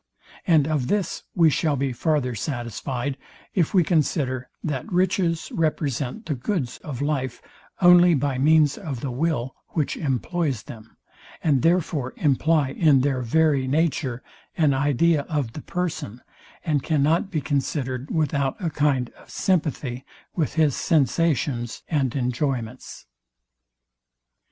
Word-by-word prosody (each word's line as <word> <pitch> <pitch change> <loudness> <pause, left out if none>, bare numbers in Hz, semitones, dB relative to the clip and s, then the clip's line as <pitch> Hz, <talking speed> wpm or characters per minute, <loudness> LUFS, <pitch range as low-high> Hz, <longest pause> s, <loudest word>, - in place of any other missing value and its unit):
And 155 -5 +4
of 150 -5 0
this 205 -4 -1
we 165 -3 +5
shall 150 +2 +1
be 135 -1 -1
farther 145 -2 0
satisfyed, 125 +3 -4 0.3
if 175 -6 +1
we 180 - +6
consider, 135 -6 0
that 140 -5 -3
riches 180 -2 +1
represent 150 - -1
the 155 - -1
goods 135 - -3
of 140 -3 -5
life, 135 -4 -2 0.4
only 175 -1 +7
by 140 -2 -1
means 150 +2 +4
of 145 - -5
the 135 - -3
will; 130 -2 -1 0.2
which 155 -4 0
employs 140 - -1
them; 110 0 -12 0.5
and 140 -5 +3
therefore 165 -6 +1
imply 150 0 +2
in 145 -4 +4
their 135 -1 0
very 140 +1 +2
nature 135 -4 0 0.3
an 155 -4 +3
idea 145 +3 +2
of 145 -7 -1
the 150 - -7
person, 165 - -4 0.5
and 150 -4 +1
cannot 155 +6 +1
be 165 -6 -1
considered 135 -2 -2
without 140 -4 0
a 170 -5 -2
kind 145 -4 +1
of - - -18
sympathy 145 -8 -1 0.3
with 155 -4 -1
his 155 -4 +3
sensations 145 -6 0
and 140 -6 0
enjoyments. 125 -2 -3
145 Hz, 130 wpm, -24 LUFS, 130-160 Hz, 0.5 s, only